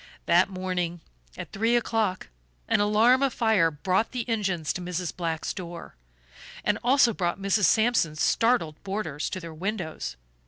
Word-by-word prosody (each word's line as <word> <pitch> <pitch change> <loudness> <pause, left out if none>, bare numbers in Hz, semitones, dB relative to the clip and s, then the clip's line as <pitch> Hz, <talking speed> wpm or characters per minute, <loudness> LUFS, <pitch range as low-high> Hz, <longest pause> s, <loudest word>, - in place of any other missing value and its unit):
That 175 +2 +4
morning 180 -2 -3 0.4
at - - -7
three 225 +4 +1
o'clock 220 -5 0 0.4
an - - +2
alarm 220 +5 +4
of 275 -3 +1
fire 220 -8 +3
brought 185 - -1
the 245 -2 -3
engines 190 -9 -1
to 180 - -5
Mrs. 180 -1 -4
Black's 165 -3 -3
door, 175 -2 -8 0.7
and - - +1
also 245 -1 +4
brought 175 -3 -1
Mrs. 200 +1 +2
Sampson's 220 -9 +2
startled 225 -11 +1
boarders 190 -7 -3
to 185 - -4
their 165 -2 -8
windows. 170 - -4
190 Hz, 150 wpm, -26 LUFS, 170-225 Hz, 0.7 s, That